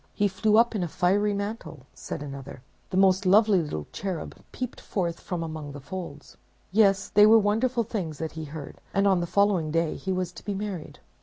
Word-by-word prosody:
"He 205 - +2
flew 210 +3 +2
up 235 +1 +4
in 210 - -1
a 175 - -1
fiery 200 +6 +1
mantle," 200 - -5
said - - -6
another; 135 -2 -8 0.3
"the 185 - -2
most 190 0 +4
lovely 200 0 +5
little 75 - -4
cherub 185 -5 -5 0.2
peeped 250 -1 -5
forth 170 -4 -2
from 175 -2 -4
among 155 -3 -6
the 145 - -8
folds." 150 -1 -8 0.3
Yes, 195 -1 +3
they 210 +1 +6
were 225 +1 +8
wonderful 230 +4 +1
things 185 -9 -4
that 160 +1 -4
he 160 0 -6
heard; 150 0 -9
and 200 0 +3
on 190 -2 +4
the 175 - -2
following 190 -3 +2
day 165 0 0
he 190 - -4
was 185 -1 -1
to - - -12
be 205 -1 -3
married. 195 -5 -5
190 Hz, 205 wpm, -26 LUFS, 160-205 Hz, 0.3 s, were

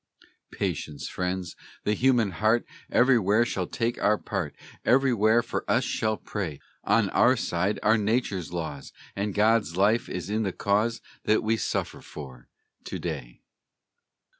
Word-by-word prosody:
Patience, 75 -2 -3
friends! 90 -1 -3 0.3
The 105 - +1
human 120 -3 +3
heart 110 +6 +2 0.3
Everywhere 120 -3 +4
shall 95 -6 -2
take 120 +1 -2
our 105 +1 +3
part, 95 -9 -4 0.3
Everywhere 120 -4 +4
for 120 - -3
us 125 - +3
shall 110 -3 0
pray; 85 -9 -5 0.2
On - - +2
our - - +4
side 95 +5 -1
are 110 +1 +4
nature's 105 - -1
laws, 80 -5 -5 0.2
And 100 0 -2
God's 105 -5 +2
life 105 +4 +3
is 90 -1 -4
in 105 +2 0
the 95 -4 -1
cause 110 +3 0 0.2
That 110 - +3
we 110 +1 +2
suffer - - -2
for 65 -5 -10 0.4
to - - -4
day. - - -6
105 Hz, 140 wpm, -27 LUFS, 90-115 Hz, 0.4 s, Everywhere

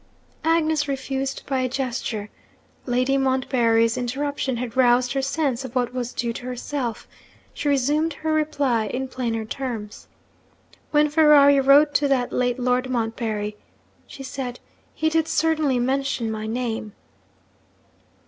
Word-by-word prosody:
Agnes 315 -2 +2
refused 270 0 -3
by 270 -2 -1
a 255 0 0
gesture. 240 -5 -3 0.6
Lady 255 +2 +1
Montbarry's 240 -4 +2
interruption 265 +1 -2
had 240 0 -5
roused 245 0 +3
her 270 - 0
sense 275 -2 -1
of 260 -1 -8
what 245 -1 0
was 245 -1 -3
due 235 -1 -2
to 245 - -8
herself. 250 -1 -4 0.5
She 295 - -2
resumed 295 +4 +1
her 315 +2 -2
reply 285 -7 +1
in 265 +5 -3
plainer 230 -4 -2
terms. 225 -4 -6 0.8
'When 300 0 +4
Ferrari 295 -2 +6
wrote 285 +2 +5
to 285 0 +2
the 260 -3 +1
late 245 0 0
Lord 250 0 0
Montbarry,' 225 -3 -2 0.5
she 270 - -10
said, 255 -2 -5 0.4
'he 315 - 0
did 320 0 +1
certainly 310 -5 +1
mention 260 -2 -1
my 215 0 -4
name.' 225 -2 -3
260 Hz, 135 wpm, -23 LUFS, 240-285 Hz, 0.8 s, Ferrari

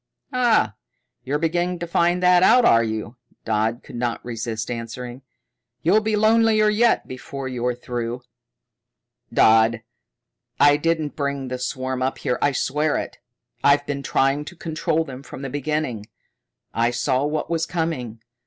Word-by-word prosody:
"Ah, 240 - +3 0.5
you're 140 +3 -1
beginning 175 +3 0
to 170 - -4
find 175 +1 +1
that 180 0 +6
out, 240 +5 +6
are 115 0 +5
you?" 110 +2 -4 0.3
Dodd 110 +2 0
could 125 - -9
not 120 -1 -2
resist 115 -1 -4
answering. 120 +2 -6 0.6
"You'll 195 +7 +4
be 215 0 0
lonelier 215 0 +4
yet 225 +2 +2
before 130 +1 -7
you're 125 -1 -2
through." 120 0 -4 1.1
"Dodd, 110 +1 +4 0.8
I 145 0 +6
didn't 160 -1 -1
bring 140 -2 -3
that 125 0 -4
swarm 130 0 -3
up 130 +1 -1
here. 125 - -2
I 145 - +3
swear 150 +3 0
it. - - -6 0.4
I've 140 0 +4
been 140 -1 -3
trying 135 +1 +1
to 175 - -9
control 160 -1 -1
them 135 -4 -9
from 140 0 -10
the 135 - -5
beginning. 145 -6 -2 0.7
I 115 +1 +2
saw 130 +2 0
what 150 +3 -2
was 165 0 0
coming. 130 -10 -3
140 Hz, 150 wpm, -22 LUFS, 120-165 Hz, 1.1 s, that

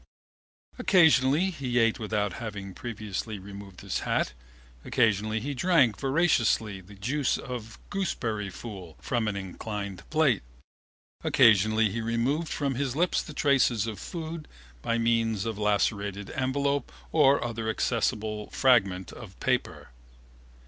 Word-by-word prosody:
Occasionally 160 - +4
he 130 -7 -3
ate 115 -1 +3
without 105 -3 -1
having 100 -4 -6
previously 110 -2 -5
removed 100 -1 -10
his - - -2
hat. 60 - 0 0.5
Occasionally 110 0 +1
he 140 +4 -3
drank 140 - +3
voraciously 125 - +2
the 100 +3 -14
juice 125 +8 0
of 120 -3 -7
gooseberry 115 - -2
fool 95 -5 -9
from 120 -3 -1
an 105 - -1
inclined 100 0 -5
plate. 155 -8 +3 0.8
Occasionally 110 0 +4
he 115 +3 -3
removed 120 +8 0
from 140 -2 -1
his 130 0 -2
lips 175 +3 +2
the 155 - -10
traces 130 -7 +3
of 110 -4 -5
food 165 -2 -6 0.3
by 115 - 0
means 115 -2 +1
of 110 -2 -3
a - - -5
lacerated 100 -1 0
envelope 140 +2 -1 0.2
or 140 -3 +4
other 115 -1 -3
accessible 110 -2 -1
fragment 100 -9 +2
of - - -11
paper. - - -1
115 Hz, 130 wpm, -28 LUFS, 105-135 Hz, 0.8 s, Occasionally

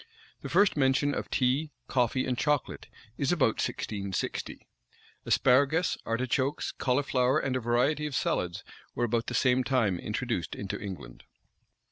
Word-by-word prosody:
The - - -6
first 205 -1 +4
mention 140 0 +2
of - - -4
tea, 135 +4 +1 0.2
coffee, 130 0 +1
and 125 - -1
chocolate, 150 +1 -1 0.3
is 140 - +1
about 140 -10 +2
1660.[*] 100 -3 -3 0.7
Asparagus, 140 +7 +3
artichokes, 130 +4 -1
cauliflower, 130 0 +1
and 135 -4 -1
a - - +1
variety 125 +6 +1
of 145 - -5
salads, 90 -7 -1 0.3
were 120 - +1
about 115 0 -1
the 125 - -3
same 130 +1 +3
time 115 -9 +1
introduced 105 -5 -3
into 100 0 -5
England. 100 -3 -8
125 Hz, 135 wpm, -29 LUFS, 115-140 Hz, 0.7 s, first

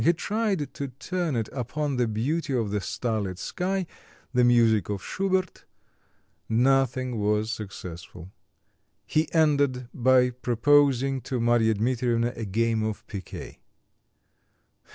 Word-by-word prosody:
He 170 - +5
tried 200 -4 -1
to 140 - -4
turn 160 +4 -3
it 110 -2 -1
upon 140 +2 -2
the 120 -1 +2
beauty 135 +8 -1
of 110 -4 -1
the 105 -1 -1
starlit 105 -5 -2
sky, 185 - -2 0.5
the 125 -1 +4
music 115 -5 +4
of 100 -3 -3
Schubert; 190 -1 -1 0.8
nothing 130 0 +2
was 105 +1 +1
successful. 90 -4 -8 0.7
He 155 +1 0
ended 140 -6 +2
by 125 0 +4
proposing 135 +2 +2
to 125 +1 -3
Marya 115 -1 +3
Dmitrievna 120 +1 0
a 115 - -4
game 115 +3 0
of 110 -1 -3
picquet. 95 -3 -8
125 Hz, 120 wpm, -26 LUFS, 110-145 Hz, 0.8 s, He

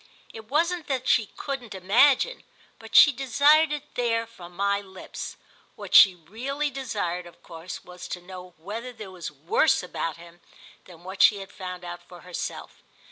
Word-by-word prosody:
It 220 -1 -11
wasn't 335 +3 0
that 260 -2 -2
she 220 -3 +3
couldn't 260 -7 -5
imagine, 250 - +3 0.4
but - - -10
she 290 - +9
desired 285 +4 +4
it 295 0 -5
there 230 -2 0
from 180 -6 -14
my 200 +1 +1
lips. 190 -1 -9 0.4
What - - -9
she 190 -2 +9
really 255 - -4
desired 200 -10 -3
of 170 - -18
course 165 +2 -9
was 180 0 -10
to 180 - -5
know 180 0 -11
whether 220 +9 -6
there 215 -5 -10
was 180 -2 -6
worse 155 - +1
about 165 -2 -4
him 170 0 -15 0.4
than 175 -2 -15
what 190 +1 -4
she 205 - +7
had 195 -1 -9
found 180 -2 -7
out 175 0 -7
for 175 0 -14
herself. 180 -1 -6
200 Hz, 170 wpm, -26 LUFS, 180-265 Hz, 0.4 s, she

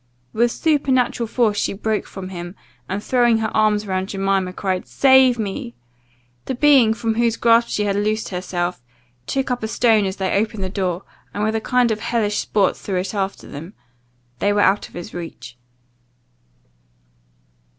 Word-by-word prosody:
With 235 +2 +2
supernatural 260 -6 +1
force 220 -2 +1
she - - 0
broke 215 +2 -2
from 190 -1 -8
him, 175 0 -7 0.3
and, 200 +2 -3
throwing 240 -3 +3
her 220 0 -2
arms 215 -1 +2
round 190 0 -2
Jemima, 195 -1 0
cried, 185 -1 -3
"Save 265 -2 +5
me!" 195 - -4 0.7
The 260 - -3
being, 255 -5 +5
from 225 -1 -1
whose 230 0 +1
grasp 235 0 +4
she 210 - -1
had 200 -1 0
loosed 215 +2 -1
herself, 180 -3 -3 0.5
took 270 -1 -1
up 245 - -1
a 220 - -2
stone 220 -2 +3
as 190 0 -2
they 190 -2 -1
opened 210 0 -1
the 185 - -2
door, 185 -1 -2 0.3
and 205 - -1
with 215 +1 +1
a 225 - -1
kind 250 0 +2
of 215 - -1
hellish 215 -3 0
sport 200 -3 +1
threw 195 - -5
it 185 +3 -3
after 195 -1 -3
them. 165 +7 -9 0.6
They 205 - +2
were 205 0 +2
out 200 +1 +2
of - - -18
his 175 - -8
reach. 165 -8 -8
210 Hz, 170 wpm, -21 LUFS, 190-235 Hz, 0.7 s, Save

